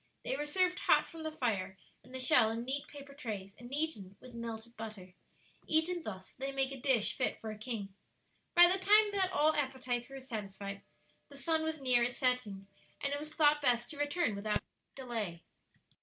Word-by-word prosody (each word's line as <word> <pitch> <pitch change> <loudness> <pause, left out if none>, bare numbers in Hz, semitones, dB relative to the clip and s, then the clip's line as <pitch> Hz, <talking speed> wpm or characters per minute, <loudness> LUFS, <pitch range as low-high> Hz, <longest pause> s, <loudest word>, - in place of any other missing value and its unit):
They - - -1
were 295 +2 -3
served 365 +3 +2
hot - - +4
from 330 - -9
the 315 0 -3
fire 200 -10 -1 0.3
and 250 - -17
the 260 - -4
shell, 250 -3 +5
in 230 +1 -3
neat 275 +2 -3
paper 280 -1 -11
trays, 210 -8 -6
and 240 +1 -10
eaten 275 -11 -3
with 255 -1 -13
melted 230 0 -6
butter. 215 -5 -8 0.5
Eaten 330 +3 +1
thus 190 -9 -8
they 270 +1 -2
make 270 0 0
a 270 - -6
dish 255 -6 +3
fit 255 - -1
for 220 - -5
a - - -6
king. 215 -4 -4 0.6
By 345 - +10
the 375 +2 +1
time 420 +2 +5
that 385 -2 +2
all 310 -2 +4
appetites 260 -3 -1
were 270 0 -7
satisfied, 200 -5 -6 0.5
the 280 - -12
sun 320 +2 +1
was 315 -1 -2
near 250 -3 +4
his 245 +1 -1
setting, 250 -7 0 0.3
and 280 0 -1
it 285 - -1
was 305 +1 -8
thought 300 -1 +4
best 240 -3 +2
to 300 - -9
return 290 - +1
without 210 +1 -1 0.3
delay. 225 -10 -4
255 Hz, 195 wpm, -34 LUFS, 220-295 Hz, 0.6 s, By